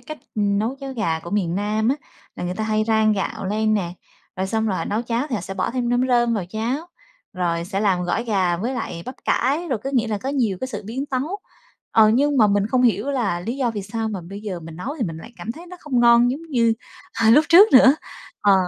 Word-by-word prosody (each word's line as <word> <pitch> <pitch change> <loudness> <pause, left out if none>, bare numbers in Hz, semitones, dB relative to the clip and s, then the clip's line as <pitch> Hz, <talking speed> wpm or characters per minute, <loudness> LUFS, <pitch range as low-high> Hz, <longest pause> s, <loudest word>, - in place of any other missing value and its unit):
cách, 310 -1 -9 0.2
ừm, 205 -1 +1
nấu 230 +6 -1
cháo 270 -1 -5
gà 185 -10 -1
của 170 - -9
miền 185 -5 0
Nam 210 +3 0
á, 275 - +2 0.4
là - - -4
người 180 +1 -3
ta 220 - -3
hay 215 0 +1
rang 220 -1 +3
gạo 195 -1 -3
lên 215 +2 +1
nè, 175 -4 -1 0.4
rồi 190 0 -1
xong 220 +2 -1
rồi 195 -4 0
họ - - -2
nấu 215 +3 -1
cháo 235 +3 -1
thì 245 - -2
họ 205 - -1
sẽ 195 +3 -7
bỏ 185 - -1
thêm 245 0 -2
nấm 245 +1 +2
rơm 240 -2 +3
vào 200 - -2
cháo, 240 - -2 0.5
rồi 170 -3 -1
sẽ 195 +2 -3
làm 190 -4 +2
gỏi 220 +7 -1
gà 185 -6 +1
với 240 +8 -3
lại 170 -8 -5
bắp 255 - -6
cải, 295 +7 +1
rồi 250 -5 0
có 270 - -2
nghĩa 240 -4 +1
là 210 -2 -2
có 265 - -5
nhiều 235 -9 0
cái 260 - -3
sự 255 - -6
biến 265 +6 -4
tấu. 285 +10 -2 0.5
Ờ, 220 -1 +6
nhưng 280 +6 +2
mà 220 -4 +6
mình 200 0 +2
không 250 +3 +1
hiểu 235 +1 +2
là 220 -10 -1
lý 235 +8 -4
do 255 -4 0
vì 210 -3 -5
sao 220 +3 -3
mà 205 -4 -4
bây 195 +4 -9
giờ 195 -5 -5
mình 160 0 -10
nấu 245 - -5
thì 245 - -1
mình 165 -4 -5
lại 165 +9 -11
cảm 230 - -5
thấy 335 +5 -12
nó 360 +1 -10
không 260 -5 0
ngon 235 +1 +6
giống 285 +5 -4
như, 240 -8 +2 0.5
ờ, 220 - +6
lúc 300 +6 +6
trước 390 +6 +7
nữa. 265 +1 +8 0.5
Ờ. 205 -1 +4
220 Hz, 265 wpm, -22 LUFS, 200-255 Hz, 0.5 s, nữa